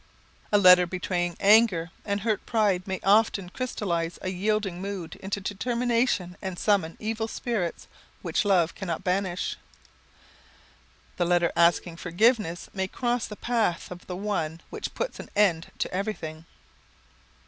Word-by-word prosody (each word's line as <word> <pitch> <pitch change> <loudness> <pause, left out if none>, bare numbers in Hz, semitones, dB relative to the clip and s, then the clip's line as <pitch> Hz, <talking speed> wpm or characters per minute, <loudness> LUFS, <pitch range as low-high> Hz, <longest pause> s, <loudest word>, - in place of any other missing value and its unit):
[Sidenote: - - -32
Misunderstood] 205 - -1
A 200 - +1
letter 180 -1 +8
betraying 175 -1 -2
anger 200 -5 +5
and 200 -1 -1
hurt 215 -1 0
pride 205 -5 +1
may 190 -1 -2
often 200 -2 +3
crystallise 175 -9 -2
a 185 - -1
yielding 195 -1 -1
mood 195 -4 -5
into 200 +1 -4
determination 230 -2 0
and 190 -2 -4
summon 190 -6 +1
evil 220 +1 -2
spirits 220 -7 -3 0.4
which - - 0
love 180 -5 +3
cannot 170 -4 -4
banish. 185 -1 -1 1.6
The 175 - +1
letter 175 -1 +2
asking 170 0 +3
forgiveness 180 0 +1
may 190 -1 -1
cross 240 +3 -1
the 210 - -8
path 220 -8 -1
of 180 0 -9
the 180 - -4
one 170 -5 -2
which - - -5
puts - - -3
an - - -8
end 180 -6 +2
to - - -2
everything. 170 -5 -4
190 Hz, 145 wpm, -27 LUFS, 175-215 Hz, 1.6 s, letter